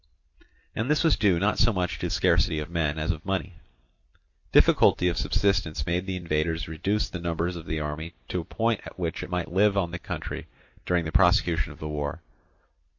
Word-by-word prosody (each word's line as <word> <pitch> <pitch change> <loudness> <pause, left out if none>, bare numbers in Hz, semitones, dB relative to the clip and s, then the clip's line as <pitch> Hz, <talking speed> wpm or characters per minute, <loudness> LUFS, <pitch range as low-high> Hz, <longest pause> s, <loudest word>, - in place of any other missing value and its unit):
And 115 +4 -2
this 150 +2 +3
was 165 -3 +4
due 100 -5 +3
not 100 +5 +1
so 120 +1 +5
much 90 -4 -2
to - - -2
scarcity 80 - +2
of 75 +2 -4
men 80 -3 0
as 80 +3 0
of 80 -1 -6
money. 95 -2 -3 0.9
Difficulty 90 - +5
of 85 - -2
subsistence 90 -8 0
made 90 +2 -1
the 95 - -2
invaders 80 -1 -1
reduce 95 +7 -1
the 90 - -6
numbers 85 +1 -2
of 85 - -8
the 80 - -2
army 75 +3 -5
to 90 - -1
a - - -9
point 115 +4 -1
at - - -11
which 85 -3 -3
it - - -7
might 90 -1 -3
live 100 +1 +3
on 90 -4 0
the 85 - -5
country - - -6 0.4
during 90 -2 +1
the 80 - -3
prosecution 90 -4 +3
of - - -12
the 75 - -6
war. 75 -1 -4
85 Hz, 200 wpm, -26 LUFS, 80-95 Hz, 0.9 s, so